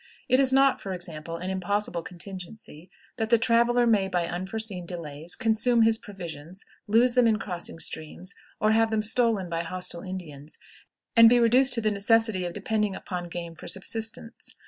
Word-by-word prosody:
It 255 Hz, +1 st, +3 dB
is 265 Hz, -1 st, +5 dB
not, 270 Hz, 0 st, +4 dB
for 190 Hz, -2 st, -4 dB
example, 165 Hz, -2 st, -6 dB
an 185 Hz, +2 st, -4 dB
impossible 190 Hz, -1 st, -1 dB
contingency 180 Hz, -1 st, -9 dB, 0.3 s
that 220 Hz, -2 st, -2 dB
the 235 Hz, -, +5 dB
traveler 235 Hz, +2 st, +3 dB
may, 210 Hz, -4 st, +3 dB
by 180 Hz, -2 st, -1 dB
unforeseen 190 Hz, 0 st, -4 dB
delays, 165 Hz, -2 st, -5 dB
consume 225 Hz, +1 st, +2 dB
his 225 Hz, 0 st, +3 dB
provisions, 175 Hz, -3 st, -9 dB, 0.2 s
lose 235 Hz, +4 st, +4 dB
them 250 Hz, -1 st, +4 dB
in 220 Hz, -1 st, +3 dB
crossing 180 Hz, -5 st, -5 dB
streams, 165 Hz, +4 st, -4 dB, 0.3 s
or 215 Hz, -, +3 dB
have 225 Hz, 0 st, +3 dB
them 220 Hz, -1 st, 0 dB
stolen 225 Hz, -4 st, +1 dB
by 165 Hz, -1 st, -2 dB
hostile 180 Hz, 0 st, -5 dB
Indians, 160 Hz, -6 st, -8 dB, 0.6 s
and 230 Hz, -1 st, +9 dB
be 245 Hz, +1 st, +5 dB
reduced 250 Hz, +3 st, +4 dB
to 230 Hz, -, 0 dB
the 215 Hz, -1 st, +1 dB
necessity 210 Hz, -1 st, +2 dB
of 175 Hz, -, -4 dB
depending 210 Hz, -1 st, -1 dB
upon 180 Hz, -2 st, -5 dB
game 170 Hz, -1 st, -7 dB
for 165 Hz, -, -11 dB
subsistence. 225 Hz, +3 st, -4 dB
200 Hz, 170 wpm, -26 LUFS, 175-225 Hz, 0.6 s, and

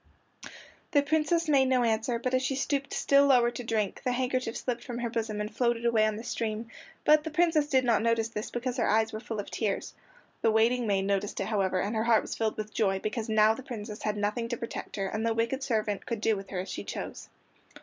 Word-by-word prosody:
The 285 Hz, -2 st, +5 dB
Princess 315 Hz, +2 st, +1 dB
made 275 Hz, -3 st, +4 dB
no 255 Hz, -1 st, +3 dB
answer, 230 Hz, +1 st, +1 dB
but 255 Hz, +2 st, -3 dB
as 255 Hz, -, +3 dB
she 265 Hz, +1 st, -1 dB
stooped 275 Hz, 0 st, -1 dB
still 280 Hz, 0 st, +4 dB
lower 245 Hz, -3 st, +5 dB
to 245 Hz, -, -6 dB
drink 220 Hz, -4 st, -1 dB
the 250 Hz, -, +1 dB
handkerchief 255 Hz, -2 st, -1 dB
slipped 240 Hz, -2 st, -3 dB
from 240 Hz, -2 st, -6 dB
her 240 Hz, -1 st, -3 dB
bosom 220 Hz, -2 st, -2 dB
and 210 Hz, +1 st, -4 dB
floated 235 Hz, -1 st, +1 dB
away 220 Hz, -2 st, +4 dB
on 215 Hz, -, -1 dB
the 220 Hz, -, -7 dB
stream, 225 Hz, -1 st, -3 dB, 0.3 s
but 305 Hz, 0 st, +6 dB
the 320 Hz, -, -4 dB
Princess 320 Hz, -2 st, +2 dB
did 260 Hz, -2 st, +3 dB
not 230 Hz, -3 st, +3 dB
notice 230 Hz, 0 st, +1 dB
this 210 Hz, -1 st, -5 dB
because 245 Hz, +1 st, -3 dB
her 235 Hz, -, +1 dB
eyes 220 Hz, +1 st, +2 dB
were 215 Hz, -, -4 dB
full 220 Hz, -1 st, -5 dB
of 205 Hz, -, -6 dB
tears. 210 Hz, -4 st, -2 dB, 0.5 s
The 225 Hz, -, +3 dB
waiting 230 Hz, +2 st, +3 dB
maid 195 Hz, -2 st, +1 dB
noticed 200 Hz, +1 st, -1 dB
it, -, -, -1 dB
however, 195 Hz, -4 st, 0 dB
and 205 Hz, +5 st, -1 dB
her 220 Hz, +1 st, 0 dB
heart 230 Hz, -2 st, +4 dB
was -, -, -5 dB
filled 220 Hz, -1 st, -1 dB
with 215 Hz, 0 st, -5 dB
joy, 195 Hz, -4 st, +1 dB
because 215 Hz, +3 st, -3 dB
now 215 Hz, 0 st, +5 dB
the 225 Hz, -, -8 dB
Princess 220 Hz, -5 st, -7 dB
had 210 Hz, -1 st, -1 dB
nothing 210 Hz, +3 st, -1 dB
to 240 Hz, -, -2 dB
protect 230 Hz, -, -6 dB
her, 195 Hz, -, -2 dB
and 215 Hz, +3 st, -3 dB
the 230 Hz, 0 st, +1 dB
wicked 230 Hz, +4 st, 0 dB
servant 215 Hz, -6 st, -1 dB
could 230 Hz, -3 st, -2 dB
do 220 Hz, 0 st, +2 dB
with 195 Hz, -1 st, -8 dB
her 190 Hz, -, -5 dB
as 190 Hz, -, -8 dB
she -, -, -5 dB
chose. -, -, -6 dB
230 Hz, 240 wpm, -29 LUFS, 215-255 Hz, 0.5 s, but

